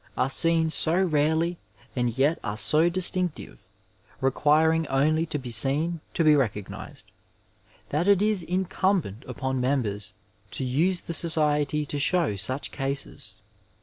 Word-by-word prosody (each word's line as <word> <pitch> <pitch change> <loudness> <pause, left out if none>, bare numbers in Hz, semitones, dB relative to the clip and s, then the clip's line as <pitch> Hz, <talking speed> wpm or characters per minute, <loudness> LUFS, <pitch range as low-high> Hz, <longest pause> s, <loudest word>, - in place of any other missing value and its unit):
are 135 - 0
seen 165 +1 +1
so 165 +3 +3
rarely 160 0 +1 0.4
and 120 -1 -1
yet 145 +5 +2
are 105 - -4
so 155 - +3
distinctive, 180 -1 -1 0.5
requiring 155 +4 +2
only 155 +5 +1
to 150 - -3
be 125 -3 -6
seen 145 +8 +3 0.2
to 165 - +1
be 155 -1 +5
recognized, 105 -8 -4 0.8
that 155 +6 -1
it 200 -2 +5
is 210 -2 +2
in 180 +3 -2
cmnbent 175 - -1
upon 130 -1 -3
members 120 -7 -2 0.4
to - - -4
use 165 +8 0
the 170 - -6
society 150 -2 +1
to 145 0 -4
show 165 - +1
such 130 +8 -3
cases. 140 0 -5
150 Hz, 140 wpm, -25 LUFS, 135-170 Hz, 0.8 s, be